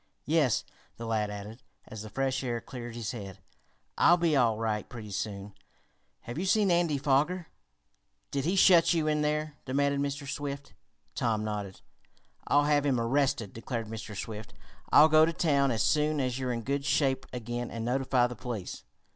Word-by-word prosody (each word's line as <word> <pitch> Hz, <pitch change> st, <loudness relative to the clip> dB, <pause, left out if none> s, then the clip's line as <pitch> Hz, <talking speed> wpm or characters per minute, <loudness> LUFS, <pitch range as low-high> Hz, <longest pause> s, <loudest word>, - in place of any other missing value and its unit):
"Yes," 150 Hz, -6 st, +2 dB, 0.3 s
the 115 Hz, -, -6 dB
lad 110 Hz, -2 st, 0 dB
added, 105 Hz, +3 st, -8 dB, 0.3 s
as 110 Hz, -, -8 dB
the 110 Hz, -, -8 dB
fresh 135 Hz, +2 st, -1 dB
air 120 Hz, -2 st, -2 dB
cleared 120 Hz, -1 st, -8 dB
his 115 Hz, 0 st, -3 dB
head. 100 Hz, -6 st, -8 dB, 0.6 s
"I'll 175 Hz, -, +6 dB
be 170 Hz, -3 st, +2 dB
all 115 Hz, -5 st, +3 dB
right 110 Hz, -2 st, -2 dB
pretty 110 Hz, -4 st, -8 dB
soon. 100 Hz, 0 st, -4 dB, 0.7 s
Have 120 Hz, +6 st, -6 dB
you 185 Hz, -, -1 dB
seen 205 Hz, -1 st, +3 dB
Andy 170 Hz, -4 st, +2 dB
Foger?" 150 Hz, +6 st, +1 dB, 0.8 s
"Did 140 Hz, -1 st, -1 dB
he 180 Hz, +4 st, +1 dB
shut 180 Hz, -2 st, +6 dB
you 160 Hz, -2 st, +1 dB
in 150 Hz, 0 st, +1 dB
there?" 150 Hz, 0 st, -1 dB
demanded 140 Hz, +1 st, +1 dB
Mr. 140 Hz, 0 st, -3 dB
Swift. 140 Hz, 0 st, -5 dB, 0.4 s
Tom 110 Hz, -3 st, 0 dB
nodded. 105 Hz, -3 st, -5 dB, 0.7 s
"I'll 145 Hz, 0 st, +4 dB
have 145 Hz, -1 st, +2 dB
him 135 Hz, -4 st, +1 dB
arrested!" 115 Hz, -3 st, 0 dB
declared 115 Hz, -1 st, -5 dB
Mr. 110 Hz, -2 st, -7 dB
Swift. 110 Hz, +2 st, -7 dB, 0.4 s
"I'll 150 Hz, -, +8 dB
go 155 Hz, 0 st, +6 dB
to 165 Hz, +1 st, +2 dB
town 140 Hz, -5 st, +2 dB
as 115 Hz, -3 st, +1 dB
soon 150 Hz, 0 st, +2 dB
as 130 Hz, -1 st, -1 dB
you're 130 Hz, -1 st, -1 dB
in 115 Hz, -1 st, -3 dB
good 140 Hz, +3 st, -1 dB
shape 135 Hz, -2 st, +1 dB
again 120 Hz, 0 st, -4 dB
and 115 Hz, -1 st, -5 dB
notify 130 Hz, 0 st, +2 dB
the 125 Hz, 0 st, -4 dB
police." 115 Hz, -5 st, -6 dB
130 Hz, 175 wpm, -29 LUFS, 115-145 Hz, 0.8 s, I'll